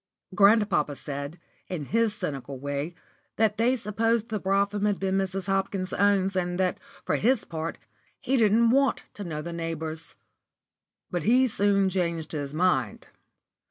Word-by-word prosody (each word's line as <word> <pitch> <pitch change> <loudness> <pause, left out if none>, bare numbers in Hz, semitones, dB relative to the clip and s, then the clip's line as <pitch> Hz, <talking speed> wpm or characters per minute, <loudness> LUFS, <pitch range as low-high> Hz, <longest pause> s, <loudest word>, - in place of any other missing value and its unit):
Grandpapa 200 -7 +4
said, 140 +4 -6 0.3
in 165 -6 -4
his 225 +4 +1
cynical 140 -8 -5
way, 145 +5 -4 0.4
that 215 -1 +2
they 240 +4 +3
supposed 225 +1 0
the 215 -1 -2
brougham 200 +2 0
was 205 -1 +2
Mrs. 190 -1 -1
Hopkins's 195 -1 -1
own, 200 -1 +3
and 180 -1 -1
that, 185 -1 +1 0.3
for - - +1
his 260 +4 +2
part, 160 0 -4 0.4
he 270 - 0
didn't 230 0 +4
want 275 0 +2
to 205 - -7
know 155 -4 -5
the 170 +1 -5
neighbours. 165 -1 -5 1.0
But 175 - -1
he 250 +8 +4
soon 200 -3 +2
changed 170 -4 -1
his 145 -3 -3
mind. 180 +4 0
190 Hz, 145 wpm, -27 LUFS, 165-210 Hz, 1.0 s, Grandpapa